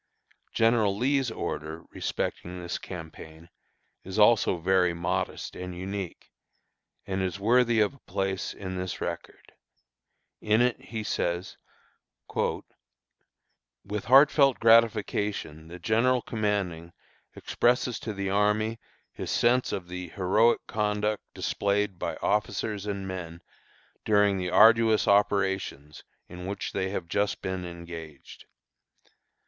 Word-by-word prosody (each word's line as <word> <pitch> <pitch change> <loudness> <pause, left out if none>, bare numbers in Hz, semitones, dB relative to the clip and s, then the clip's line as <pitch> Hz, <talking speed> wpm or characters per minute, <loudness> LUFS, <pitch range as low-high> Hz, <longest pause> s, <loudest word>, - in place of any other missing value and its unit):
General 115 -3 +2
Lee's 135 +2 +1
order 80 -6 -5
respecting 90 +1 -4
this 85 -1 -4
campaign 80 -1 -10 0.5
is 95 +2 -6
also 105 -3 +4
very 90 0 +2
modest 85 0 -3
and 90 -1 -7
unique, 95 -1 -6 0.7
and 95 0 -2
is 95 +1 -2
worthy 120 +2 +3
of 105 - +2
a 140 - -19
place 95 -4 -3
in 95 -1 -6
this 90 -1 -4
record. - - -6 0.9
In 110 +1 +2
it 125 0 +1
he 110 -1 -5
says: 85 -2 -2 0.8
"With - - -1 1.4
heartfelt 135 +1 +6
gratification 105 -8 +2
the 85 +2 -9
General 115 +7 +2
commanding 95 -6 -2 0.4
expresses 125 0 +1
to 110 - -5
the 100 -2 -3
army 105 +3 +1 0.3
his - - -6
sense 125 +2 +2
of 90 -2 -4
the 90 0 -6
heroic 105 +6 +2
conduct 105 0 -1
displayed 100 -2 -1
by - - -3
officers 105 0 -1
and 100 -1 -3
men 85 -2 -7 0.6
during 105 -2 +3
the 90 -1 -2
arduous 110 +2 +5
operations 95 -7 +1 0.2
in 90 +1 -8
which 100 - -4
they 95 -1 -2
have 95 -3 -4
just 100 +4 -1
been 95 -1 -3
engaged. 85 -4 -10
100 Hz, 115 wpm, -27 LUFS, 90-110 Hz, 1.4 s, heartfelt